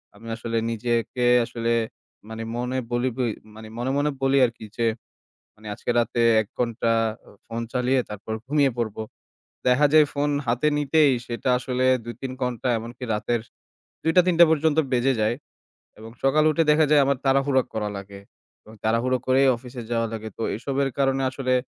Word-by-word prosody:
আমি 115 +3 -13
আসলে 115 0 -3
নিজেকে, 120 +1 -1 0.2
আসলে 115 0 -2 0.6
মানে, 110 0 -6
মনে 125 +2 -2
বলি 120 +2 +1
বই 120 -3 0 0.2
মানে, 110 0 -10
মনে 125 +2 -1
মনে 145 +1 +1
বলি 135 +1 +3
আর 115 - -2
কি 110 - -9
যে, 115 - +1 0.7
মানে, 110 0 -13
আজকে - - -8
রাতে 120 +1 0 0.2
১ 105 - -8
ঘণ্টা 115 -1 0 0.5
ফোন 115 0 -5
চালিয়ে 125 +1 +2
তারপর 105 +1 -6
ঘুমিয়ে 140 -2 +2
পড়বো। 110 -1 -2 0.7
দেখা 140 +4 +4
যায়, 155 -1 +7
ফোন 145 +1 0 0.2
হাতে 120 +6 +1
নিতেই 150 0 +3
সেটা 120 +2 -3
আসলে 130 -1 -1 0.2
২-৩ 130 +2 -6
ঘণ্টা, 125 0 -2
এমনকি 120 +3 -8
রাতের 115 +2 -1 0.6
২টা-৩টা 170 +1 +5
পর্যন্ত 160 0 +2 0.2
বেজে 130 +2 +2
যায়। 110 +3 +1 0.6
এবং 110 +1 -10
সকাল 150 +3 +3
উঠে 165 +1 +2
দেখা 155 +1 +5
যায়, 150 - +6
আমার 140 -2 +1
তাড়াহুড়া 135 0 +3
করা 105 -1 -2
লাগে 100 0 -9 0.4
এবং 110 - -14
তাড়াহুড়ো 120 +3 +1
করেই 135 +1 +4
অফিসে 125 0 -9
যাওয়া 115 0 +1
লাগে। 110 0 -5
তো - - -3
এসবের 135 +3 -1
কারণে 135 0 +1
আসলে, 130 -1 -1
125 Hz, 165 wpm, -24 LUFS, 115-135 Hz, 0.7 s, যায়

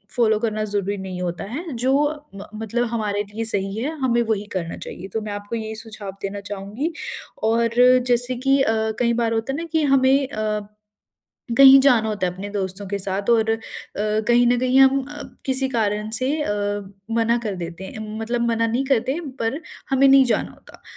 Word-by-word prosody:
Follow 220 -3 +3
करना 215 -1 -1
ज़रूरी 205 -1 -2
नहीं 185 -1 -6
होता 175 0 -3
है। 300 - -6
जो 255 +3 +1 0.4
मत 200 - -9
मतलब 225 +2 -1
हमारे 210 -3 -1
लिए 225 +1 -3
सही 195 -2 0
है, 250 +6 -1
हमें 240 -2 +2
वही 220 -3 -1
करना 170 -3 -3
चाहिए। 190 - -8
तो 220 - -1
मैं 210 - -5
आपको 205 +2 -5
यही 220 -1 -4
सुझाव 220 -3 -8
देना 200 +1 -4
चाहूँगी। 205 - -4 0.5
और 230 +1 +2 0.4
जैसे 245 +1 +1
कि 270 +2 +2
अ, 225 - +2 0.3
कई 235 -1 +2
बार 230 -1 0
होता 225 +4 -1
है - - -3
ना 335 - -4
कि 315 -1 +2
हमें 270 0 +3
अ, 215 -3 -2 1.0
कहीं 270 0 +10
जाना 240 -5 +4
होता 205 -3 -1
है 180 - -4
अपने 200 +2 -7
दोस्तों 195 -1 -4
के 200 +1 -3
साथ 195 +2 -2
और 225 -1 +3
अ, 225 - +1 0.4
कहीं 220 +3 +2
न 245 0 +3
कहीं 255 +1 +3
हम 270 0 +5
अ, 295 0 -7 0.2
किसी 265 0 +1
कारण 215 -3 -1
से 255 +2 0
अ, 295 - -2 0.6
मना 230 +1 +2
कर 200 - -2
देते 170 +2 -9
हैं 215 +2 -7
मतलब 235 +1 -1
मना 230 0 +1
नहीं 245 +4 0
करते 260 +6 0 0.2
पर 245 +8 -1 0.3
हमें 270 +1 +5
नहीं 270 0 +7
जाना - - -2
होता। - - -18
225 Hz, 195 wpm, -22 LUFS, 205-255 Hz, 1.0 s, कहीं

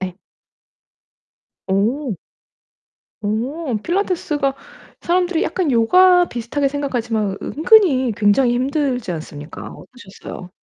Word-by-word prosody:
네. 185 -1 -5 1.5
오. 225 +6 0 1.1
오 240 +6 -2
필라테스가 340 - -1 0.5
사람들이 355 -1 +1
약간 350 -6 -1
요가 355 +10 +5
비슷하게 245 +2 -2
생각하지만 235 -8 -2
은근히 310 - +3
굉장히 235 +4 +3
힘들지 260 - -1
않습니까? 155 -1 -8
어떠셨어요? 195 -6 -11
260 Hz, 245 characters per minute, -19 LUFS, 215-315 Hz, 1.5 s, 요가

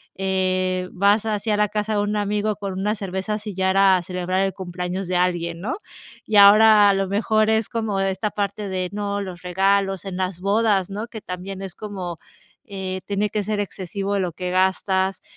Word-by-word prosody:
eh, 185 -1 0
vas 200 +3 +3
así 215 0 -2
a 210 - +2
la 210 0 +3
casa 210 +1 -2
de 205 - +1
un 205 +1 0
amigo 210 +1 0
con 200 -2 -5
unas 210 +3 0
cervezas, 195 +2 -3
y 205 - -5
ya 190 0 +1
era 195 -1 +5
celebrar 180 +1 -2
el 195 -1 0
cumpleaños 180 0 -4
de 180 - +1
alguien, 170 -2 0
¿no? 220 +8 -3 0.5
Y 215 - -3
ahora 210 +1 +8
a - - +2
lo 195 0 0
mejor 215 +1 +2
es 220 -1 +2
como 220 -4 -2
esta 195 +2 -1
parte 200 0 -3
de 185 -1 -2
no 205 -1 -2
los 185 -3 -7
regalos 195 +1 +1
en 190 -2 -5
las 185 -1 -2
bodas, 200 -1 +2
¿no? 210 +3 -4
Que 225 - -8
también 185 +2 -6
es 190 -2 -7
como, 185 -5 -6 0.5
eh, 190 -2 -5
tiene 205 +1 0
que 210 -1 -1
ser 210 0 -2
excesivo 200 +1 -3
lo 180 -3 -2
que 180 0 -4
gastas, 190 +1 +1
195 Hz, 195 wpm, -22 LUFS, 185-210 Hz, 0.5 s, ahora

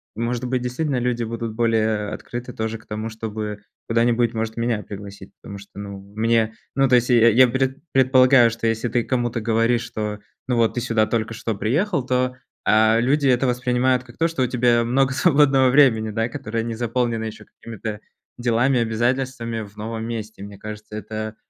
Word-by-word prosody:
Может 120 +2 -2
быть, 125 0 -1
действительно 130 +2 -2
люди 120 -1 -1
будут 115 -1 -5
более 110 -2 +1
открыты 120 +1 -7
тоже 110 0 -3
к 110 - -21
тому, 110 +1 -4
чтобы 110 -1 -5 0.3
куда-нибудь, 115 0 +2
может, 110 0 -3
меня 115 -2 -1
пригласить. 100 -1 -10
Потому 100 - -8
что, 100 0 -15
ну, 100 -1 -7 0.2
мне 115 0 +2 0.2
ну, 135 0 +3
то 125 - +4
есть 125 +1 +2
я 115 -1 +6
я 125 +2 +6
пред 130 +2 -1
предполагаю, 130 -2 +5
что 115 0 -5
если 115 +1 0
ты 120 +1 0
кому-то 120 -2 -1
говоришь, 115 +1 +2
что, 105 -2 -4 0.3
ну, 125 - +1
вот 115 -1 +2
ты - - 0
сюда 115 -3 +1
только 110 0 -2
что 110 0 -3
приехал, 140 - 0
то, 125 0 0 0.3
э, 110 +1 +4
люди 140 +3 +2
это 130 0 +3
воспринимают 125 +1 +1
как 120 -1 -16
то, 165 +1 +2
что 150 -6 -1
у - - +1
тебя 120 -1 +2
много 135 +2 +2
свободного 135 -3 +4
времени, 120 -6 +4
да, 115 +2 -1
которое 115 0 -4
не 115 0 -4
заполнено 115 -1 -1
ещё 110 - -7
какими-то 110 -1 -7 0.4
делами, 120 +2 +2
обязательствами 120 0 -1
в 100 0 -14
новом 110 +1 -5
месте. 110 -3 -6
Мне 100 -1 -10
кажется, 105 0 -9
это 110 0 -5
115 Hz, 185 wpm, -22 LUFS, 110-125 Hz, 0.4 s, я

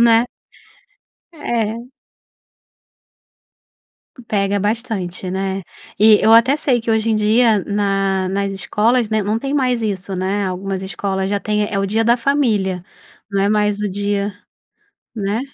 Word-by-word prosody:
né. 230 0 +5 1.1
É. 230 -8 -2 2.5
Pega 200 -1 0
bastante, 205 -4 -3
né? 190 0 -2 0.4
E 215 0 +7
eu 220 - +5
até 255 +5 +5
sei 265 -5 +1
que 225 - -3
hoje 220 0 +1
em 215 - +2
dia, 215 +1 +3
na 195 -2 0
nas 195 +1 -1
escolas, 220 +4 +1
né, 220 -1 0
não 210 +3 -1
tem 275 +3 -3
mais 250 -4 +1
isso, 195 -2 -3
né. 195 +2 -1
Algumas 190 +1 -4
escolas 190 0 -3
já 200 -1 0
têm, 210 0 0
eh, 200 - 0
o 195 - 0
dia 225 +3 0
da 235 +1 +4
família, 230 -8 +1 0.5
não 195 -1 0
é 200 - +2
mais 210 -1 +1
o 210 - -1
dia 200 +1 -1 0.8
né? 210 +2 -2
210 Hz, 145 wpm, -18 LUFS, 195-225 Hz, 2.5 s, E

